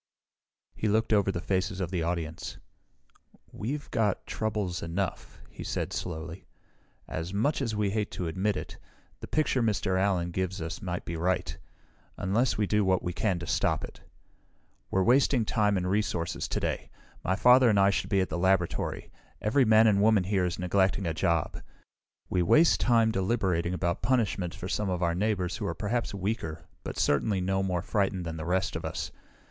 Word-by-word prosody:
He 110 - -2
looked 110 +2 +2
over 100 -2 +3
the 85 - -3
faces 95 +1 -1
of 90 -2 -2
the 90 -3 -1
audience. 80 -1 -3 0.9
"We've 140 +7 -4
got 105 -5 0
troubles 105 -5 -2
enough," 90 +3 -4
he - - -8
said - - -3
slowly. 85 +1 -5 0.6
"As 85 +5 -4
much 140 +9 +1
as 115 -5 -1
we 105 -2 0
hate 105 0 -1
to 90 - -3
admit 95 +4 0
it, - - -7 0.4
the - - -8
picture 150 -4 +1
Mr. 100 -4 +1
Allen 90 -3 +1
gives 95 +1 -2
us 80 +4 -5
may 90 -3 -2
be 85 - -4
right 90 +2 -1 0.6
unless 110 +7 +1
we 105 - +2
do 105 +1 +2
what 95 -2 +2
we 90 - -2
can 95 0 0
to 85 - -6
stop - - 0
it. - - -9 0.9
"We're 95 - +2
wasting 125 0 +4
time 105 -2 +2
and 90 0 -1
resources 95 -4 -1
today. - - -2 0.3
My 95 - +1
father 125 +4 +6
and 105 -2 +3
I 100 0 +5
should - - -2
be 100 -1 +3
at 95 - -1
the 85 - -3
laboratory. 95 -1 0 0.3
Every 125 +5 +3
man 110 0 +6
and 100 -2 +4
woman 105 -2 +4
here 95 -1 +1
is 90 - -2
neglecting 95 +1 +1
a 80 - 0
job. 85 0 0 0.7
We 90 - +1
waste 155 - +5
time, 115 -2 +3
deliberating 95 -4 0
about 85 +1 -1
punishment 105 -8 0
for 90 - -6
some 105 +1 -1
of 90 -1 -1
our 85 0 +2
neighbors 95 -1 -1
who 105 - -3
are - - -3
perhaps 115 +3 -1
weaker, 95 -5 -3 0.2
but - - -6
certainly 95 +7 +2
no 95 +1 0
more 90 -3 -1
frightened 95 -3 0
than 80 -1 -4
the 80 - -5
rest 95 +1 0
of - - -4
us. - - -4
95 Hz, 185 wpm, -28 LUFS, 90-105 Hz, 0.9 s, father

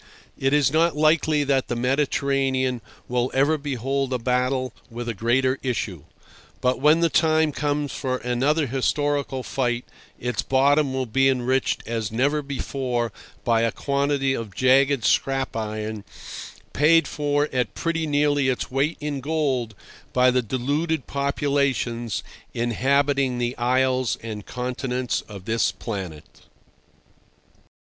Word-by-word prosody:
It 135 0 0
is 145 -1 +3
not 165 0 +3
likely 155 -1 +3
that 135 -2 +1
the 120 - -2
Mediterranean 135 -1 0 0.3
will 125 +1 0
ever 140 +4 +3
behold 135 -2 -2
a 125 - +1
battle 125 +1 0 0.2
with 120 +1 -6
a 120 - -1
greater 130 +5 +1
issue; 105 - -3 0.5
but 125 0 +1
when 155 +3 +5
the 170 - +5
time 160 -1 +3
comes 145 0 -1
for 130 -2 -2
another 135 +6 +1
historical 140 +1 -1
fight 120 -2 -1 0.3
its 125 0 -1
bottom 140 +2 +3
will 130 0 -1
be 135 +4 +3
enriched 130 0 0
as 115 -3 -3
never 140 +6 +1
before 130 -4 -2 0.3
by 115 -1 +2
a 115 0 +2
quantity 140 0 0
of 110 -6 -5
jagged 135 0 +3
scrap 135 -2 +1
iron, 110 -1 -4 0.7
paid 165 +3 +4
for 145 0 0
at 125 -5 -1
pretty 165 -1 -1
nearly 145 -2 +2
its 125 - -2
weight 140 +5 0
of 145 -2 -3
gold 135 -7 -1 0.4
by 125 0 +5
the 125 0 +2
deluded 140 +7 -1
populations 140 -5 -1 0.3
inhabiting 135 +2 +1
the 120 0 -1
isles 130 0 +1
and 105 -3 -6
continents 125 -2 -2
of 100 -3 -10
this 115 +1 +1
planet. 95 -9 -7
130 Hz, 130 wpm, -24 LUFS, 120-145 Hz, 0.7 s, when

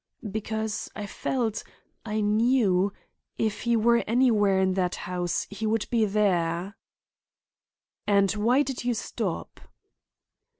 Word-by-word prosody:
"Because 220 0 -3
I 210 - -5
felt—I 220 -1 -4
knew—if 210 -1 0
he 235 -1 +1
were 235 +1 +3
anywhere 220 -5 +3
in 190 0 +2
that 185 -1 0
house 180 -1 -2
he 210 +2 -3
would 220 0 0
be 230 -2 +3
there!" 190 -2 0 1.3
"And 200 -1 +4
why 235 +7 +3
did 270 -4 -5
you 245 -1 0
stop?" - - -4
210 Hz, 110 wpm, -26 LUFS, 195-230 Hz, 1.3 s, And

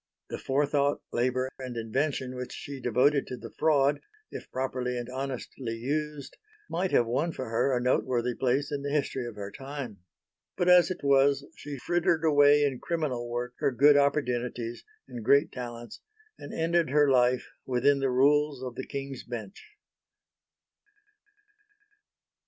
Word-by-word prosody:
The - - -4
forethought, 145 +1 +1
labour 130 +2 0
and 125 -2 -6
invention 130 +3 -1
which 125 0 -6
she 140 -1 -7
devoted 130 +4 +2
to 125 - -6
the - - -10
fraud, 145 -2 +2 0.3
if - - -8
properly 130 -1 -2
and 120 -1 -4
honestly 130 -2 -5
used, 145 +4 -4 0.3
might 185 +3 -1
have 120 - +3
won 140 +9 0
for 130 - -5
her 115 +4 +1
a 125 - +1
noteworthy 125 -1 +1
place 135 +4 0
in 145 -1 -2
the 140 - -3
history 140 -4 -1
of 115 - -8
her 100 -1 -6
time. 135 -5 -7 0.6
But 180 - +2
as 180 0 +7
it 185 -4 -5
was, 140 0 +3
she 145 -1 -7
frittered 165 +2 +1
away 145 -1 +5
in 135 -3 0
criminal 140 -8 -2
work 120 +1 -3
her - - +2
good 140 +4 +6
opportunities 125 -4 0 0.2
and 120 -2 -7
great 140 +7 +4
talents, 120 -2 -7 0.4
and - - -10
ended 165 0 +1
her 145 +1 +4
life 125 -1 +2 0.2
within 135 +3 +3
the 135 -1 +1
rules 140 +1 +2
of 125 -2 -5
the 130 - -7
King's 135 -1 -5
Bench. 120 - -7
135 Hz, 150 wpm, -28 LUFS, 125-145 Hz, 0.6 s, as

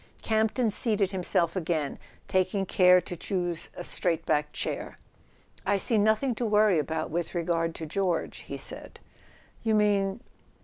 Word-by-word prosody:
Campton 220 +1 +1
seated 205 -3 +2
himself 175 -2 0
again, 160 -5 -1 0.3
taking 185 +1 +1
care 180 -1 +6
to 175 - -6
choose 175 -2 -3
a 175 - -5
straight 170 -2 0
backed 150 0 +1
chair. - - -4 0.7
"I 200 - +2
see 215 +3 +1
nothing 220 +5 +2
to - - +1
worry 210 -4 +4
about 155 +2 -2
with 170 +2 -3
regard 165 -1 0
to 160 - -5
George," 180 +1 -1
he - - -7
said. - - -8 0.3
" - - -29
You 220 -1 +2
mean 205 0 +2
185 Hz, 150 wpm, -28 LUFS, 170-210 Hz, 0.7 s, care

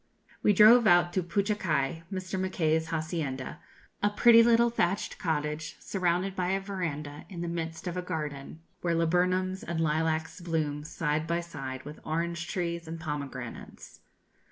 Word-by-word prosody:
We - - +4
drove 220 +3 +7
out 175 -1 +5
to 185 - +1
Puchacai, 175 -5 0
Mr. 185 0 -3
Mackay's 160 -4 +1
hacienda, 155 -3 -3 0.4
a 205 - +3
pretty 230 +2 +7
little 235 0 +5
thatched 195 -3 -1
cottage, 155 -1 -2
surrounded 185 0 -1
by 180 -2 -1
a 195 - +1
verandah, 160 -7 -5
in 175 -4 -6
the 175 - -3
midst 165 -1 -4
of 175 -1 -3
a 180 - -1
garden, 155 -4 -5 0.2
where 170 -1 +1
laburnums 180 +3 +1
and 170 -1 -3
lilacs 160 +1 0
bloom 155 -4 -1
side 155 0 -1
by 170 +1 +1
side 135 -6 -7
with 150 +1 -9
orange 170 +1 -2
trees 170 -2 -3
and 165 +1 -6
pomegranates. 140 -6 -7
170 Hz, 150 wpm, -29 LUFS, 155-185 Hz, 0.4 s, drove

